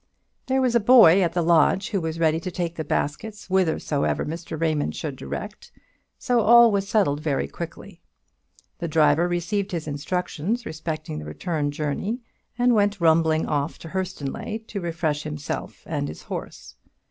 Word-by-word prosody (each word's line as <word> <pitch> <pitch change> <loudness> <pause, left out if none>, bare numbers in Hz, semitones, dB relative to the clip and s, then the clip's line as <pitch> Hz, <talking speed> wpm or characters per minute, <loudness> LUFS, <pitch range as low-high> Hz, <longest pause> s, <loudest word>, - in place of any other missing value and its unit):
There 265 0 +2
was 250 -2 +2
a 235 - +5
boy 215 -6 +7
at 170 -2 +1
the 175 -1 +1
lodge 170 +5 +3
who 195 -4 0
was 160 0 -3
ready 160 -1 +2
to 175 - -5
take 175 -2 -3
the 160 - -3
basket 180 +9 -2
whithersoever 175 -6 0
Mr. 160 0 -6
Raymond 155 -3 0
should 150 -4 -4
direct; 210 +9 -7 0.5
so 245 -3 +1
all 235 +1 +7
was 200 -1 0
settled 190 -10 +2
very 145 - -1
quickly. 70 - -9 0.8
The 170 - -3
driver 155 +1 +3
received 180 +3 -2
his 165 -3 -3
instructions 180 +8 -2
respecting 155 - -5
the 75 - -8
return 145 - -2
journey, 155 - -2 0.4
and 245 0 +3
went 205 -2 +2
rumbling 160 -1 +3
off 145 +1 -2
to 165 - -10
Hurstonleigh 190 +4 -4
to 200 - -4
refresh 165 -3 -1
himself 150 -1 -5
and - - -2
his 80 +2 -9
horse. 60 -5 -8
165 Hz, 160 wpm, -24 LUFS, 150-200 Hz, 0.8 s, boy